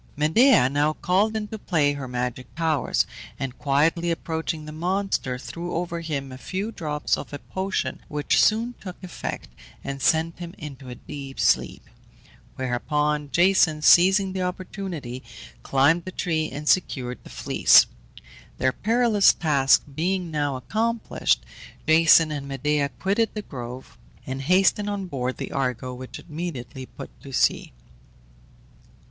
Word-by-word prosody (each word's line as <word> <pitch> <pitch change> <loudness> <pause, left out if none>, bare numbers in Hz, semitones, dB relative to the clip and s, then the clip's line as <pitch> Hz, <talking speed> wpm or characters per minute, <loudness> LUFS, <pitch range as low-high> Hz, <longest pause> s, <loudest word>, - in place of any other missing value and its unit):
Medea 160 - +5
now 145 +3 +1
called 195 +7 +1
into 215 0 -4
play 150 -7 +1
her 140 -2 -6
magic 125 0 -4
powers, 160 -3 +1 0.3
and 130 -2 -5
quietly 155 +5 +2
approaching 160 -1 -3
the 155 - -7
monster, 175 -5 -1
threw 170 +6 -6
over 170 0 -2
him 140 -5 -4
a 130 - -9
few 195 +9 -4
drops 150 -7 -1
of - - -8
a - - -3
potion, 190 +6 -3
which 150 -1 +1
soon 230 +3 +2
took 185 -3 -7
effect, 180 - -6 0.4
and 135 0 -5
sent 160 +4 +2
him 175 +1 -7
into 140 -4 -9
a 125 - -7
deep 135 +1 -9
sleep; - - +1 0.7
whereupon 150 +4 -1
Jason, 175 -3 +4
seizing 190 +3 +6
the 190 - -2
opportunity, 180 - -5 0.4
climbed 145 +6 +3
the 185 - -7
tree 160 -4 -1
and 145 +3 -7
secured 125 -9 +1
the - - -13
Fleece. - - +5 0.7
Their 130 0 +2
perilous 225 - +4
task 140 -5 +3
being 175 +3 -1
now 145 -3 -1
accomplished, 220 - 0 0.4
Jason 160 0 +6
and 140 -2 -4
Medea 140 +1 0
quitted 200 - -1
the 210 - -4
grove, 125 -3 -9 0.3
and 135 +1 -4
hastened 190 +6 +3
on 200 -1 -3
board 130 -6 -3
the - - -5
Argo, 130 -1 -2
which 125 +1 -8
immediately 150 -6 -6
put 135 - -10
to 140 - -10
sea. - - +1
155 Hz, 140 wpm, -24 LUFS, 135-185 Hz, 0.7 s, seizing